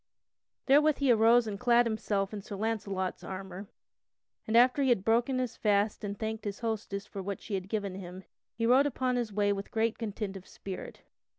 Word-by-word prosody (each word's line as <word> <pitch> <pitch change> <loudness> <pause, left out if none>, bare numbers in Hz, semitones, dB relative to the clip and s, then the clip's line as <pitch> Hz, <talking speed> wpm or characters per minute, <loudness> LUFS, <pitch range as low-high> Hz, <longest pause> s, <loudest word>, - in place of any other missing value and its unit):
Therewith 295 +2 +5
he 275 -3 +3
arose 230 +1 +5
and 205 -2 -5
clad 240 0 +4
himself 210 -3 -1
in 205 - -5
Sir 200 +1 -7
Launcelot's 200 -3 -2
armor, 190 +1 -7 0.8
and 220 +1 +3
after 250 +3 +5
he 270 - +3
had 205 -6 +2
broken 240 +4 +2
his 255 -2 -2
fast 205 0 +1
he 205 - -3
thanked 220 +1 -4
his 205 +1 -5
hostess 215 -3 -3
for 195 - -7
what 200 +1 -4
she 215 - -8
had 190 -1 -3
given 200 -3 -2
him, 185 0 -8 0.3
and 230 0 +1
rode 265 +4 +5
upon 255 -2 -1
his 240 -3 -1
way 205 0 +2
with 195 0 -6
great 225 0 0
content 210 -3 -4
of 190 -1 -10
spirit. 190 -2 -8
215 Hz, 195 wpm, -30 LUFS, 195-235 Hz, 0.8 s, Therewith